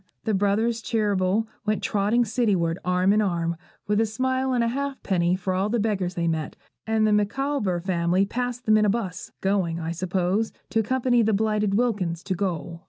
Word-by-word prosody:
The 220 - 0
brothers 210 +4 +1
Cheeryble 205 -2 +1 0.2
went 215 0 -1
trotting 215 +4 +2
cityward 195 -7 0
arm 180 +2 +2
in 215 - +3
arm, 170 -4 0 0.3
with 210 +1 +2
a 225 - +1
smile 260 +4 -1
and 245 -2 +2
ha'penny 230 -9 0
for 185 0 -2
all 190 +3 0
the 235 +2 0
beggars 195 -4 -1
they 170 -1 0
met; 160 -2 -2 0.3
and 220 0 +2
the 215 - +3
Micawber 210 -2 0
family 180 +1 +1
passed 245 +3 -3
them 215 0 +5
in 215 - +3
a - - +3
bus, 195 -4 -3
going, 190 -4 0
I 165 0 -3
suppose, 185 +4 -1 0.2
to 225 - +2
accompany 245 +2 +2
the 220 -1 +2
blighted 210 -1 +1
Wilkins 200 -8 0
to 190 - -2
gaol. 175 -3 -3
205 Hz, 180 wpm, -25 LUFS, 180-225 Hz, 0.3 s, them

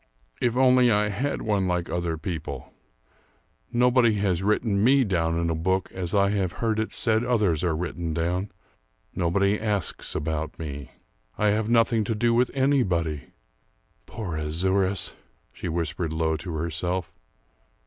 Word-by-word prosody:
If 120 0 +1
only 125 -1 +5
I 105 -1 +2
had 130 +8 -2
one 100 -3 +1
like 90 -1 -1
other 85 -2 -2
people! 80 -5 -6 1.0
Nobody 125 -2 +4
has 95 -3 0
written 105 0 +1
me 135 +3 +5
down 85 -6 0
in 85 0 0
a - - 0
book 95 +4 -1
as 90 0 -3
I 100 0 +3
have 95 -3 -1
heard 110 -2 -1
it 110 - -2
said 110 0 +1
others 105 -10 +1
are 85 -3 +1
written 85 0 -3
down. 90 +5 -1 0.6
Nobody 100 +4 +1
asks 105 -5 -2
about 80 0 -3
me. 70 -4 -6 0.5
I 105 - +3
have 110 +1 0
nothing 115 -1 +3
to 115 - -1
do 115 +2 +2
with 120 +1 +3
anybody! 90 - +1 0.8
Poor 95 -8 -5
Azouras," 95 +5 0 0.4
she - - -5
whispered 85 0 -2
low 80 0 0
to 85 +3 -6
herself. 85 +2 -2
95 Hz, 150 wpm, -25 LUFS, 85-110 Hz, 1.0 s, only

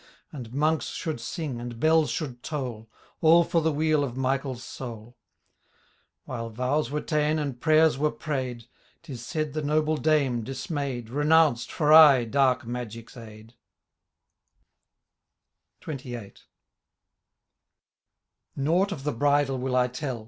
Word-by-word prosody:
And 125 -6 -8
Monks 155 +4 0
should 155 -9 -4
sing, 130 -1 -5
and 120 -1 -7
bells 160 +1 +3
should 130 -7 -4
toll. 120 -7 -5 0.3
All 165 +1 +6
for 165 0 0
the 160 0 +1
weal 155 0 +1
of 125 -4 -4
MichaePs 130 0 -1
soul. 120 -2 -9 1.1
While 115 -2 -5
vows 125 +7 -1
were 150 +1 -2
ta'en, 150 0 0
and 140 -5 -4
prayers 155 -3 +4
were 150 +1 +1
prav'd^ 130 -6 -4 0.4
Tis 130 -8 -8
said 155 +3 -3
the 155 - -2
noble 155 +1 +1
dame, 140 -7 +1
di^ay^d. 135 -2 -4
Renounced, 150 -2 +3
for 150 -1 +2
aye, 150 -6 +8
dark 130 +1 +1
magic*s 115 -1 -7
aid* 110 -1 -12 2.3
XXVIIl. 125 -8 -7 2.2
Nought 170 +8 +1
of 150 -8 -6
the 150 0 -1
bridal 145 +1 +1
will 130 0 -2
I 125 -1 +3
tell. 125 -1 -5
135 Hz, 125 wpm, -26 LUFS, 120-155 Hz, 2.3 s, aye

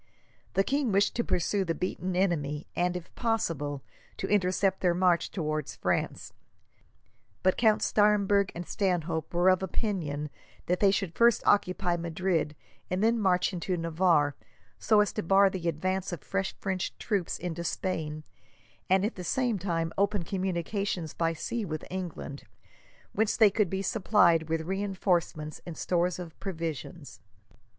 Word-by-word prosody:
The 195 - +4
king 275 0 0
wished 200 +1 +2
to 235 - +2
pursue 190 +2 0
the 165 -2 -2
beaten 185 0 -3
enemy 155 -6 0
and, 180 0 +1
if 175 - -11
possible, 155 - -1 0.3
to - - -3
intercept 190 -1 +1
their 175 -2 +3
march 180 -1 +2
towards 155 -5 -3
France, - - -2 1.1
but 185 - +4
Count 220 -2 +3
Staremberg 205 -2 +3
and 175 +1 -5
Stanhope 170 -5 -1
were 175 +1 +2
of 185 0 +3
opinion 170 -7 -2 0.3
that 180 +1 0
they 200 - +5
should 195 -3 0
first 235 +2 +4
occupy 185 -3 +2
Madrid, 170 -2 -1 0.3
and 185 +3 0
then 230 +1 +3
march 185 -2 +2
into 180 +1 -2
Navarre, 165 -3 +2 0.5
so 215 -2 +4
as 205 - 0
to - - -2
bar 195 +3 +4
the 180 -3 -4
advance 185 +4 -2
of 175 -5 -6
fresh 195 0 -2
French 190 -2 -3
troops 200 -5 -1
into 170 -1 -4
Spain, 155 -4 -3 0.7
and 190 +1 +4
at 220 - -1
the 180 - -7
same 240 +2 0
time 165 -3 -1
open 200 -2 +1
communications 185 -1 -2
by 165 -1 0
sea 225 +8 -3
with 155 -5 -4
England, 175 -6 -6 0.7
whence 220 +1 +1
they 215 -3 +6
could 210 -2 +1
be 190 +1 -2
supplied 180 -6 +3
with 160 0 0
reinforcements 180 -4 -1
and 170 -3 -8
stores 175 0 0
of 175 -3 -9
provisions. 165 - -5
180 Hz, 150 wpm, -29 LUFS, 165-195 Hz, 1.1 s, they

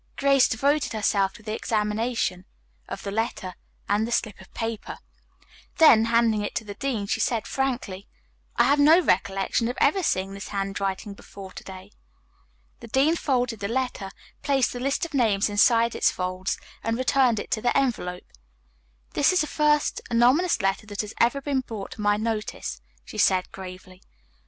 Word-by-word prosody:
Grace 275 -1 +4
devoted 280 +5 0
herself 200 -2 +1
to 215 +1 -16
the 215 0 -4
examination 215 -4 -1 0.4
of - - -6
the 200 - -4
letter 215 -3 -3 0.3
and 210 +2 +1
the - - -6
slip 220 -4 -1
of - - -17
paper. 225 -2 -4 0.8
Then, 230 -9 +7
handing 230 -2 +2
it 205 - -4
to - - -1
the 205 -1 -7
dean, 230 -2 -2
she - - -1
said 230 -3 0
frankly: 245 -8 -3 0.5
"I - - +4
have 280 +4 +3
no 310 +4 +7
recollection 195 - 0
of 245 - -4
having 380 +7 +3
seen 195 - -1
this 200 +1 -7
handwriting 195 0 -3
before 195 -1 -11
to - - -10
day." 190 +1 -11 0.9
The 235 - -10
dean 275 +8 +2
folded 250 -7 -1
the 200 - -3
letter, 245 -4 -2 0.3
placed 275 -2 +1
the 245 - -5
list 275 +6 -1
of 335 - -10
names 215 -6 +2
inside 230 +3 +4
its - - +2
folds 185 +1 -3 0.3
and 225 +1 -1
returned 255 -3 +2
it - - -7
to 215 - 0
the 245 - +1
envelope. 225 -10 -1 0.9
"This 285 - +3
is 370 - +2
the - - 0
first 300 -1 +1
anonymous 250 - +3
letter 195 +2 0
that 205 -1 -3
has 210 0 -7
ever 240 +4 +2
been 275 -1 0
brought 220 -5 -7
to - - -8
my 205 0 +2
notice," 215 - -4 0.2
she - - -8
said 185 -1 +2
gravely. 185 0 -10
225 Hz, 175 wpm, -25 LUFS, 200-260 Hz, 0.9 s, Then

